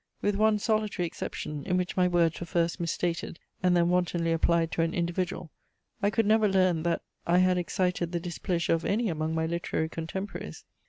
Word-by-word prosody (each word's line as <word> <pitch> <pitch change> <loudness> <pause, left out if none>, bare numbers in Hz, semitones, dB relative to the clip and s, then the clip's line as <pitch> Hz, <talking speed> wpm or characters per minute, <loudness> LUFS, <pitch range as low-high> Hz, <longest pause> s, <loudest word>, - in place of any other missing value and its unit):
With 205 - +1
one 215 +1 +3
solitary 215 -4 0
exception 150 -3 -5
in 180 -1 0
which 180 0 -2
my 180 -1 +3
words 170 -2 +2
were 175 - -6
first 170 0 0
misstated 170 0 -2 0.2
and 180 -1 +3
then 170 0 +3
wantonly 175 -2 +1
applied 165 0 +2
to - - 0
an 165 0 0
individual, 175 -1 -2 0.5
I 200 - +3
could 225 +2 +1
never 215 0 +4
learn 185 -4 +3
that 170 +1 -1 0.2
I 175 +1 +4
had 185 0 +4
excited 180 -1 -1
the 175 - -1
displeasure 170 0 -1
of 165 0 0
any 220 +2 +1
among 160 -1 -2
my 160 0 0
literary 165 -1 -2
contemporaries. 165 - -6
175 Hz, 190 wpm, -28 LUFS, 165-185 Hz, 0.5 s, never